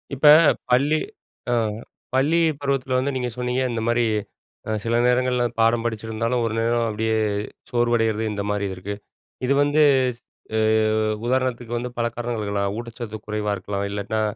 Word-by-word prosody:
இப்ப 150 +3 +3 0.4
பள்ளி 145 +5 +3 0.5
அ - - +2 0.6
பள்ளி 150 +6 +3 0.2
பருவத்துல 135 -2 -1
வந்து 140 +2 -1
நீங்க 125 -1 -1
சொன்னீங்க, 125 +1 -1
இந்த 115 -1 -2
மாரி, 120 0 +2 0.6
அ - - -4
சில 115 0 0
நேரங்கள்ல 125 0 +2 0.2
பாடம் 115 +1 +3
படிச்சிருந்தாலும், 115 +2 -1
ஒரு 110 - -2
நேரம் 115 +1 +1
அப்டியே 110 +1 0 0.5
சோர்வடைறது. 115 -2 +1
இந்த 100 -1 -3
மாரி 100 -1 -1
இருக்கு. 100 +3 -5 0.5
இது 140 - +3
வந்து, 145 +2 +2 0.4
ஸ் - - -26 0.4
அ, - - +2 0.7
உதாரணத்துக்கு 125 -2 -1
வந்து 125 +1 -3
பல 120 0 +1
காரணங்கள் 120 -2 -3
இருக்கலாம். 100 0 -1
ஊட்டச்சத்து 115 -2 -6
குறைவா 105 0 -1
இருக்கலாம் 100 +1 -3
இல்லாட்னா, 105 +2 -2
120 Hz, 145 wpm, -23 LUFS, 110-125 Hz, 0.7 s, இப்ப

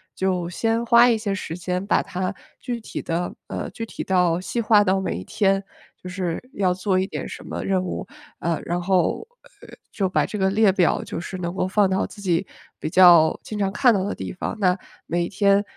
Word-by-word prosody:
就 185 -2 -1
先 225 +5 0
花 235 +1 +6
一 230 - +3
些 205 -2 -2
时 165 -3 -5
间 180 +1 -3
把 205 - +2
它 185 +2 -3 0.3
具 245 -2 -3
体 220 - -6
地 175 +1 -3
呃， - - -4
具 225 +4 -5
体 - - -7
到 180 -3 +2
细 235 +6 -2
化 215 -2 +5
到 190 0 +2
每 190 - -2
一 90 - -6
天， 195 -1 +1 0.4
就 180 - -7
是 180 -3 -3
要 185 -2 +1
做 185 +1 0
一 185 - +1
点 - - -5
什 - - -9
么 - - -5
任 190 -1 +1
务。 185 - -5 0.3
呃， 170 -3 -1
然 175 +1 -1
后， 185 - +1 0.3
呃， - - -13 0.2
就 195 -3 0
把 - - +2
这 210 - -5
个 190 -1 +2
列 205 0 +4
表 185 -2 +2
就 - - -5
是 180 +2 -6
能 170 -1 -4
够 185 - 0
放 200 0 +3
到 190 0 +1
自 205 - -11
己 180 -1 +1 0.3
比 155 - -3
较 170 -3 +6
经 215 - -6
常 195 -2 0
看 245 +4 +4
到 195 -3 0
的 200 - -2
地 - - -6
方， 180 - -4
那 185 -2 +3 0.3
每 170 0 0
天， 200 0 +3
190 Hz, 235 characters per minute, -23 LUFS, 180-205 Hz, 0.4 s, 花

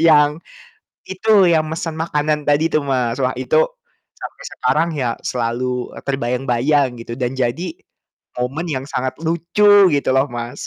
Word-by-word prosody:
Yang 150 -1 +4 0.6
itu, 190 -1 +3
yang 160 -2 +2
mesen 160 +1 -4
makanan 150 -2 -1
tadi 155 +3 +3
tuh, 155 - +3
Mas, 130 -3 -1
wah, 130 0 0
itu 480 - +1 0.6
sampai - - -9
sekarang 165 - +1
ya, 125 -4 -1
selalu, 125 +1 -2
eee, - - -10
terbayang-bayang 135 +2 +1 0.2
gitu, 115 - -7
dan 125 +1 -2
jadi 135 - -2 0.6
momen 135 +7 -2
yang 130 -2 -3
sangat 130 -2 -2
lucu, 190 +5 +4
gitu 140 -2 +1
loh, 135 +2 +3
Mas. 120 +3 -6
145 Hz, 145 wpm, -19 LUFS, 125-165 Hz, 0.6 s, Yang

